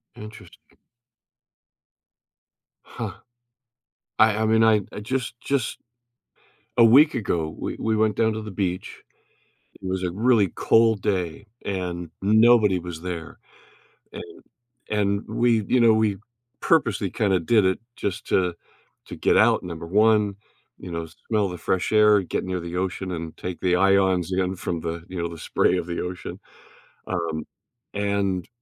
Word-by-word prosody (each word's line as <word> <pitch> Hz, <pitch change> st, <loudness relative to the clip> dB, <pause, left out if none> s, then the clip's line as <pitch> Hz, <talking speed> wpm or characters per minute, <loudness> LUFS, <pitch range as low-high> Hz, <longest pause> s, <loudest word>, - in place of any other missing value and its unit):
Interesting. 105 Hz, 0 st, -13 dB, 2.1 s
Huh, -, -, -6 dB, 1.1 s
I 110 Hz, -1 st, +5 dB
I 110 Hz, -, +1 dB
mean, 110 Hz, +1 st, +3 dB
I 110 Hz, -2 st, +4 dB
I -, -, -6 dB
just 120 Hz, +1 st, -3 dB
just 135 Hz, -3 st, -1 dB, 1.0 s
A 120 Hz, -, +7 dB
week 135 Hz, +8 st, +6 dB
ago, 85 Hz, -9 st, -1 dB
we -, -, -4 dB
we 110 Hz, 0 st, 0 dB
went 110 Hz, -1 st, +1 dB
down 110 Hz, -1 st, +2 dB
to 110 Hz, -, -4 dB
the 110 Hz, -1 st, -7 dB
beach, 90 Hz, -2 st, -4 dB, 0.8 s
it 95 Hz, -, -8 dB
was 95 Hz, 0 st, -2 dB
a 90 Hz, -, -1 dB
really 110 Hz, 0 st, +3 dB
cold 115 Hz, +1 st, +3 dB
day, 95 Hz, -2 st, -2 dB, 0.2 s
and 90 Hz, -3 st, -4 dB
nobody 110 Hz, -1 st, +5 dB
was 85 Hz, -2 st, -8 dB
there, 85 Hz, -3 st, -6 dB, 0.7 s
and -, -, -10 dB, 0.5 s
and 100 Hz, -1 st, 0 dB
we, 115 Hz, 0 st, +2 dB
you 125 Hz, -, +3 dB
know, 115 Hz, -2 st, +6 dB
we 110 Hz, -3 st, +1 dB, 0.4 s
purposely 115 Hz, -, +1 dB
kinda 95 Hz, -2 st, +1 dB
did 105 Hz, +4 st, +3 dB
it 95 Hz, 0 st, +1 dB, 0.2 s
just 100 Hz, 0 st, -4 dB
to 90 Hz, -2 st, +1 dB, 0.5 s
to -, -, -7 dB
get -, -, +2 dB
out, -, -, +4 dB
number 85 Hz, -2 st, -7 dB
1, 105 Hz, 0 st, +3 dB, 0.4 s
you 90 Hz, -, -9 dB
know, 85 Hz, -1 st, -4 dB, 0.2 s
smell 105 Hz, -4 st, +1 dB
the 90 Hz, -, -6 dB
fresh 90 Hz, +1 st, -1 dB
air, 105 Hz, -1 st, +5 dB
get 90 Hz, -, -3 dB
near 95 Hz, -1 st, -3 dB
the 85 Hz, 0 st, -6 dB
ocean, 95 Hz, 0 st, -3 dB
and 80 Hz, -2 st, -6 dB
take 90 Hz, -1 st, -6 dB
the 90 Hz, -1 st, +2 dB
ions 95 Hz, -1 st, +2 dB
in 95 Hz, 0 st, 0 dB
from 85 Hz, -1 st, -4 dB
the, 85 Hz, +1 st, -5 dB
you 90 Hz, -1 st, -4 dB
know, 85 Hz, -, -1 dB
the 85 Hz, -1 st, -9 dB
spray -, -, +1 dB
of 85 Hz, -, -4 dB
the 85 Hz, -, -3 dB
ocean, 90 Hz, -1 st, -6 dB, 0.7 s
um, 85 Hz, -4 st, -3 dB, 0.5 s
and 100 Hz, -3 st, -1 dB
95 Hz, 150 wpm, -24 LUFS, 90-110 Hz, 2.1 s, A